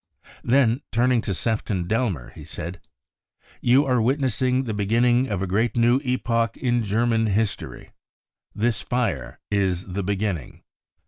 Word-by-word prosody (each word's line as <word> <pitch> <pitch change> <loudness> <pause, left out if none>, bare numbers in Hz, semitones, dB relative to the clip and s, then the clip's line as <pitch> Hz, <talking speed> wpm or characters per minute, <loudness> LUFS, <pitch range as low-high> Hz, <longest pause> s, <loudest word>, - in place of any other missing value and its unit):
Then 120 0 +3
turning 120 +1 +2
to 100 - -3
Sefton 105 -4 -1
Delmer, 100 - -1
he - - -11
said: 85 +4 -6
c< - - -38 0.7
You 130 +4 +4
are 125 -3 +2
witnessing 130 0 +1
the 115 -4 -3
beginning 120 +5 +2
of 100 -4 -2
a - - 0
great 110 +5 0
new 120 +2 +4
epoch 115 -3 0
in 120 -2 +1
German 115 +1 +1
history. 105 +1 -2 0.6
This 110 -1 0
fire 70 - -2
is 95 -3 0
the 95 +1 -4
beginning." 95 - -3
115 Hz, 140 wpm, -24 LUFS, 100-125 Hz, 0.7 s, You